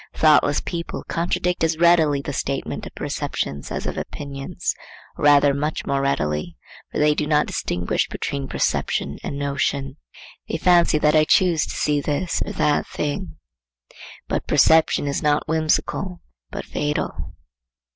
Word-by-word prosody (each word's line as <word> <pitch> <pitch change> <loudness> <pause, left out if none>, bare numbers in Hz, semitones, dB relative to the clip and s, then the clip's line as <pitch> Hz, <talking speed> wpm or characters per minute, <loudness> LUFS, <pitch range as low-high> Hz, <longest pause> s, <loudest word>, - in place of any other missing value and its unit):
Thoughtless 150 -2 +4
people 170 -1 -5
contradict 175 +1 -1
as 160 0 +1
readily 160 -4 +4
the 145 - -4
statement 135 0 -3
of - - -13
perceptions 70 +1 -3
as - - -4
of - - -3
opinions, 140 -1 -4 0.4
or - - -3
rather 145 -1 +6
much 150 +3 -2
more 140 0 0
readily; 75 - -1 0.3
for - - -4
they 150 0 +4
do 150 0 -2
not 150 -1 +3
distinguish 90 0 -1
between 140 -1 -4
perception - - -1
and 140 - -4
notion. 140 0 -2 0.5
They - - -1
fancy 170 -2 +4
that 150 0 +3
I 155 0 +5
choose 170 -2 +3
to - - -6
see 145 -1 +1
this 150 +5 -1
or - - -6
that 150 -1 +1
thing. 155 +3 -4 0.9
But - - -2
perception 160 -2 +4
is 140 - -1
not 150 +1 +1
whimsical, 160 +3 0 0.3
but - - -6
fatal. 150 0 -3
150 Hz, 145 wpm, -22 LUFS, 140-160 Hz, 0.9 s, rather